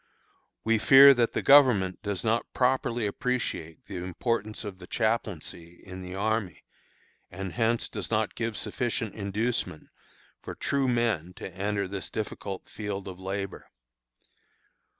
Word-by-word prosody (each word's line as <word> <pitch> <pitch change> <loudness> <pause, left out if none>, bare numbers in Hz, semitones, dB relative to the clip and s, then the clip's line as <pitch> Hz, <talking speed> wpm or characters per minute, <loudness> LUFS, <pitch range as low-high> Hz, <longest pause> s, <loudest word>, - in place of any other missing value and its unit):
We 115 0 +2
fear 140 +4 +9
that 120 -3 +1
the - - -1
Government 125 -10 +5
does 100 -3 -3
not 115 +1 0
properly 125 -3 +1
appreciate 105 - -3
the 95 - -7
importance 105 +5 -2
of 100 -3 -7
the 90 - -11
chaplaincy 95 -7 -2
in 95 -1 -8
the 90 0 -7
army, 110 -1 -1 0.7
and 95 +1 -6
hence 115 0 +1
does - - -5
not 110 -1 0
give 115 -2 -3
sufficient 115 -4 -2
inducement 105 -4 -2 0.5
for - - -7
true 140 -1 0
men 115 -8 0
to 95 - -8
enter 100 +1 -1
this 95 0 -5
difficult 100 -2 -5
field 100 -2 -5
of 95 -1 -8
labor. 95 +1 -5
105 Hz, 135 wpm, -28 LUFS, 95-115 Hz, 0.7 s, fear